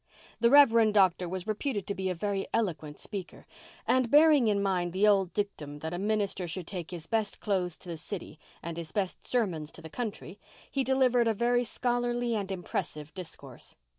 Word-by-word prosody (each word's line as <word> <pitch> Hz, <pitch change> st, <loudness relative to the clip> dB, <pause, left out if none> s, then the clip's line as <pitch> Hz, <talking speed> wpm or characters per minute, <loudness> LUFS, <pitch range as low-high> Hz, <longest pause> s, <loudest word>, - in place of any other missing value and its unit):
The 235 Hz, +1 st, +4 dB
Reverend 230 Hz, -6 st, +6 dB
Doctor 185 Hz, -3 st, +4 dB
was 185 Hz, 0 st, -4 dB
reputed 215 Hz, 0 st, -2 dB
to 200 Hz, -, -2 dB
be 190 Hz, -1 st, -2 dB
a 180 Hz, -, -1 dB
very 195 Hz, +2 st, -2 dB
eloquent 160 Hz, -9 st, -2 dB
speaker; 195 Hz, -4 st, -6 dB, 0.4 s
and, 255 Hz, -2 st, +2 dB
bearing 295 Hz, -3 st, +6 dB
in 205 Hz, -1 st, +2 dB
mind 180 Hz, -3 st, 0 dB
the 200 Hz, +3 st, +3 dB
old 195 Hz, -3 st, +3 dB
dictum 165 Hz, -8 st, -4 dB
that 160 Hz, +1 st, -4 dB
a 175 Hz, -, -3 dB
minister 200 Hz, -3 st, -1 dB
should 175 Hz, +1 st, -3 dB
take 175 Hz, -2 st, -6 dB
his 170 Hz, -3 st, -7 dB
best 220 Hz, +1 st, -1 dB
clothes 185 Hz, -5 st, -1 dB
to 180 Hz, -, -10 dB
the 165 Hz, -, -4 dB
city 170 Hz, -2 st, -7 dB, 0.2 s
and 170 Hz, 0 st, -5 dB
his 165 Hz, -2 st, -5 dB
best 195 Hz, -3 st, -3 dB
sermons 180 Hz, -11 st, 0 dB
to -, -, -10 dB
the 160 Hz, -, -9 dB
country, 210 Hz, -4 st, -5 dB, 0.3 s
he 275 Hz, -, 0 dB
delivered 255 Hz, -2 st, +3 dB
a 225 Hz, -, +2 dB
very 245 Hz, +3 st, +2 dB
scholarly 240 Hz, 0 st, -1 dB
and 200 Hz, -3 st, -2 dB
impressive 155 Hz, -4 st, -4 dB
discourse. 185 Hz, -3 st, -9 dB
200 Hz, 190 wpm, -29 LUFS, 175-230 Hz, 0.4 s, Reverend